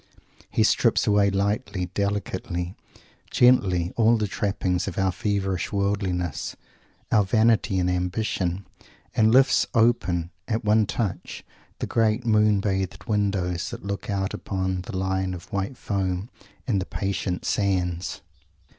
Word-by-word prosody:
He - - +2
strips - - +3
away 100 -1 +4
lightly, 100 -2 -1
delicately, 95 -3 -2 0.6
gently, 95 -8 +3
all 115 0 +4
the 110 - 0
trappings 95 -3 -1
of 90 - -5
our 95 -1 +2
feverish 95 -2 -1
worldliness, 100 -5 -1 0.6
our 105 -3 +5
vanity 110 -1 +2
and 90 -1 +1
ambition, 90 0 -1 0.5
and 110 0 +4
lifts 130 +1 +5
open, 95 -7 +2 0.2
at 110 -1 -2
one 105 0 +4
touch, 105 -6 -3 0.3
the - - -3
great 115 +1 +1
moon 105 -2 +3
bathed 95 -2 -2
windows 100 -5 -1
that - - -8
look 100 +1 -4
out 95 -1 -1
upon 95 -1 -2
the 95 - -4
line 95 0 -1
of 90 - -12
white 100 +6 -2
foam 95 +2 -2 0.3
and 100 -6 +1
the 95 - -5
patient 95 -2 -2
sands. 90 -3 -1
100 Hz, 130 wpm, -25 LUFS, 90-105 Hz, 0.6 s, our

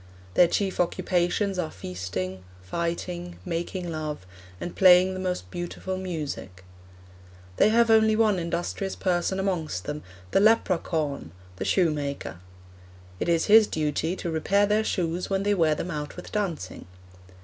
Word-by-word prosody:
Their 175 - +6
chief 195 +2 -1
occupations 180 +2 +1
are 160 -3 -1
feasting, 90 - -5 0.2
fighting, 170 - -4
making 175 0 -3
love, 155 -9 -4 0.3
and 175 - -5
playing 185 0 +6
the 185 - -5
most 180 -1 -3
beautiful 175 +2 -4
music. 150 - -5 0.9
'They - - +5
have 230 +1 +4
only 220 -1 +5
one 215 -4 +3
industrious 175 +3 -3
person 185 +1 0
amongst 165 - -2
them, 150 +1 -4 0.3
the - - +4
lepra 205 -4 +4
caun 145 - -3 0.3
the - - -3
shoemaker.' 145 - 0 0.8
It - - -1
is 165 -1 +3
his 215 0 +7
duty 155 +3 -1
to 170 - -4
repair 195 +6 +2
their 210 +1 +2
shoes 175 -4 -1
when 195 0 0
they 205 0 +2
wear 160 -5 +3
them 180 - -4
out 150 -2 -5
with - - -9
dancing. 175 - -3
175 Hz, 145 wpm, -26 LUFS, 155-190 Hz, 0.9 s, his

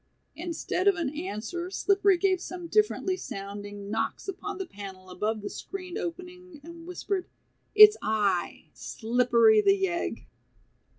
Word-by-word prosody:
Instead 350 +3 -2
of 400 - +6
an 320 -5 -2
answer 345 - -4
Slippery 395 0 +3
gave 375 0 +1
some 355 -1 -7
differently 380 0 +1
sounding 205 - -7
knocks 220 - -2
upon 390 +1 -5
the 385 - -4
panel 190 - -10
above 210 +3 -2
the - - -3
screened 365 -2 -6
opening 360 -1 -7
and 335 +1 -11
whispered, 365 +1 -3 0.5
"It's 425 0 +10
I, 205 -4 -1
Slippery, 230 -2 +3
the 395 - +3
yegg." 350 -3 -2
340 Hz, 130 wpm, -27 LUFS, -, 0.5 s, It's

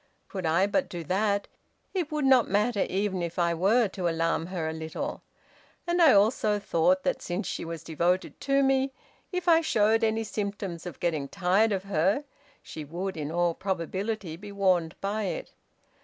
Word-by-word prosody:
Could 190 -5 -3
I 170 +4 +3
but 270 +7 0
do 175 -2 -5
that, 200 +4 0 0.5
it 350 -5 -2
would 300 -2 0
not 260 -3 +5
matter 210 +1 +1
even 190 -1 -1
if 170 -1 -4
I 170 -1 +2
were 205 +7 +3
to 185 -2 -2
alarm 165 0 0
her 175 -4 -3
a 160 - -2
little. 160 0 -5 0.6
And 345 0 +1
I 320 -5 +8
also 210 0 +3
thought 185 -1 +2
that - - 0
since 180 +3 -3
she - - -3
was 165 -1 -6
devoted 175 +3 -1
to 275 0 +2
me, 270 0 +2 0.4
if 360 -1 -3
I 330 -1 +6
showed 225 -7 +2
any 225 0 +1
symptoms 200 -5 -4
of 175 - -8
getting 155 -5 -1
tired 195 +6 +2
of 190 -2 -1
her, 195 - +1 0.4
she 155 - -7
would, 180 +6 -4
in 150 -1 -4
all 175 0 +1
probability, 190 0 -3
be 205 +4 -10
warned 185 -5 +1
by 205 +2 -1
it. - - -4
195 Hz, 180 wpm, -28 LUFS, 170-220 Hz, 0.6 s, I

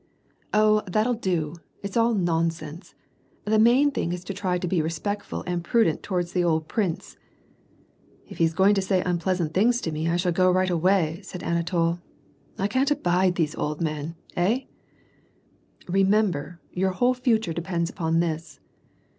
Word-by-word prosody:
Oh, 215 0 +4
that'll 215 +6 +1
do! 175 -8 -2 0.3
It's 200 -1 -5
all 230 0 +3
nonsense. 165 -2 -2 0.5
The 215 +1 +2
main 250 +6 +5
thing 175 -10 -2
is 180 0 -5
to 195 - -5
try 185 -2 -1
to 180 - -3
be 175 -1 +1
respectful 185 +6 -3
and 175 -1 -2
prudent 200 -4 +2
towards 175 -3 -2
the 180 - +1
old 160 -2 +1
prince.^' 190 -7 -2 0.6
*' - - -31
If - - -10
he's 165 -1 +2
going 195 +3 +5
to 195 - +1
say 190 -1 +1
unpleasant 175 -2 -1
things 230 +6 +3
to 160 - -3
me, 155 +2 -2
I 170 - +1
shall 175 0 +1
go 185 +2 +3
right 185 0 +2
away," 175 -1 +2
said 180 - -9
Anatol. 170 0 0 0.6
"I 195 - 0
can't 260 +6 +1
abide 180 -8 +2
these 160 -3 0
old 150 0 -3
men. 155 0 -3 0.2
Hey? 215 +10 0 0.4
" - - -37
" - - -31
ilemeraber, 190 -4 +1 0.2
your 190 +1 0
whole 245 +6 +2
future 225 -8 0
depends 170 0 -2
upon 165 -2 0
this." 160 -3 -4
180 Hz, 170 wpm, -25 LUFS, 165-205 Hz, 0.6 s, main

